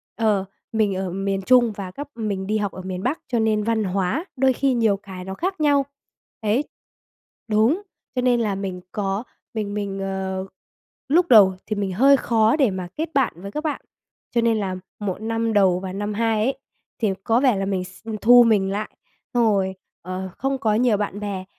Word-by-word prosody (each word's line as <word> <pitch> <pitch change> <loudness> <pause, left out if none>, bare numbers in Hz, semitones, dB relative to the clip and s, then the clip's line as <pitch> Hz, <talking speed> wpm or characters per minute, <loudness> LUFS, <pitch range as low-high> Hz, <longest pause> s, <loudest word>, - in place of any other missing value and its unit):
ờ, 210 -4 +1 0.3
mình 215 -3 +1
ở 190 0 -2
miền 195 +1 -1
Trung 240 +3 +4
và 195 -3 -7
các 285 +10 -7
mình 205 -4 -3
đi 215 +1 +1
học 205 -2 -1
ở 185 - -8
miền 185 0 -5
Bắc, 270 +7 0
cho 240 -2 0
nên 215 -1 +2
văn 225 0 +1
hóa 195 - -1
đôi 265 0 +3
khi 270 +1 +1
nhiều 225 -4 +2
cái 190 -2 -9
nó 190 - -5
khác 370 - -3
nhau. 285 -2 +3 0.6
Đấy. 220 +6 +1 0.8
Đúng, 225 - +3 0.3
cho 250 - +1
nên 245 -1 +3
là 210 -4 0
mình 190 -2 -4
có 195 +1 -2 0.3
mình 210 -3 -3
mình, 200 -1 -3
ờ, 190 -1 -3 0.6
lúc 345 +5 +4
đầu 205 -5 +8
thì 215 - -1
mình 200 -2 -2
hơi 275 +8 +6
khó 225 -2 +3
để 270 -8 +3
mà 185 -1 -4
kết 320 +1 -2
bạn 270 -4 +2
với 200 +1 -7
các 300 - -4
bạn. 300 - -2 0.5
Cho 235 - +2
nên 230 -1 +2
là 195 -3 -2 0.2
1 200 -1 -3
năm 225 0 -1
đầu 190 -3 +4
và 185 0 -6
năm 205 +2 -3
2 220 0 +1
ấy, 265 - -1 0.4
thì 210 -4 +2
có 230 +1 +3
vẻ 255 -4 +3
là 195 - -1
mình 195 -2 -1
x 185 +3 -14
ừm, 220 -1 -4
thu 240 +4 +7
mình 205 -4 +2
lại, 210 +2 -3 0.5
xong 240 - +4
rồi, 195 -3 +1 0.3
ờ, 185 +1 -5
không 270 +1 -1
có 225 -5 +1
nhiều 235 -2 +3
bạn 205 -1 -3
bè. 200 -3 -4
210 Hz, 210 wpm, -23 LUFS, 195-235 Hz, 0.8 s, đầu